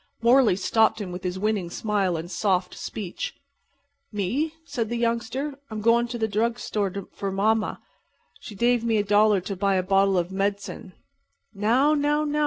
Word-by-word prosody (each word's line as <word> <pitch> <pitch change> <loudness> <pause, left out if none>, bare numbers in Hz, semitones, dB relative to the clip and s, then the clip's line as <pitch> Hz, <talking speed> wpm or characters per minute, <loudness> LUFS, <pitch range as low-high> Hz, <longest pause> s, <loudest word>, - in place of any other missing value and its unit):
Morley 240 -4 +5
stopped 220 +4 +2
him 195 -4 -5
with 180 +1 -7
his 180 0 -2
winning 205 -3 -1
smile 195 -2 0
and 170 +3 -6
soft 185 -1 0
speech. 215 - -5 0.8
"Me?" 235 - -1
said 250 -7 -3
the 240 - -2
youngster. 235 +5 -1 0.2
"I'm 215 -1 -5
doin' 235 +2 +3
to 240 0 -5
the 220 -1 0
drug 225 +3 0
'tore 200 -4 -3
for 195 -1 -4
mamma. 215 +3 +1 0.6
She 210 - -10
dave 240 +2 +2
me 230 -2 +1
a 205 - +2
dollar 205 -1 +4
to 195 +2 -5
buy 195 +1 +1
a 185 - +1
bottle 195 0 +3
of 175 +1 -1
med'cin." 200 -1 -3 0.6
"Now, 235 +9 +3
now, 295 0 +1
now!" 300 0 -1
210 Hz, 175 wpm, -25 LUFS, 195-235 Hz, 0.8 s, Morley